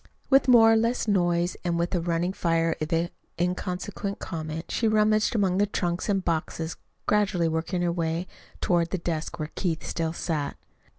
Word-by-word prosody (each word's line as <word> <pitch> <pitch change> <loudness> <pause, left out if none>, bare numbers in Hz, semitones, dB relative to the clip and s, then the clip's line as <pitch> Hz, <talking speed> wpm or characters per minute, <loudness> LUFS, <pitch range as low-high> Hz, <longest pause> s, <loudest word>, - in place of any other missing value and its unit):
With 270 +1 +5
more 225 -3 +7
or - - +5
less 230 +2 +1
noise 175 -3 +2
and 170 -1 0
with 170 +2 -1
a 175 - +1
running 170 +2 0
fire 165 -2 +1
of 165 +2 0 0.3
inconsequent 180 +3 -2
comment, 160 -1 -5
she 230 - +1
rummaged 215 +1 +3
among 195 -3 +2
the 205 - +3
trunks 175 -1 -2
and 195 -2 +1
boxes, 165 0 -2 0.3
gradually 205 -5 +2
working 165 +3 -1
her 175 - +2
way 165 0 -1 0.4
to, - - -1
ward 170 -1 +3
the 190 - -1
desk 170 -1 -3
where 155 -1 -4
Keith 165 -4 -2
still 165 -1 -2
sat. 155 -4 -2
175 Hz, 175 wpm, -26 LUFS, 165-200 Hz, 0.4 s, more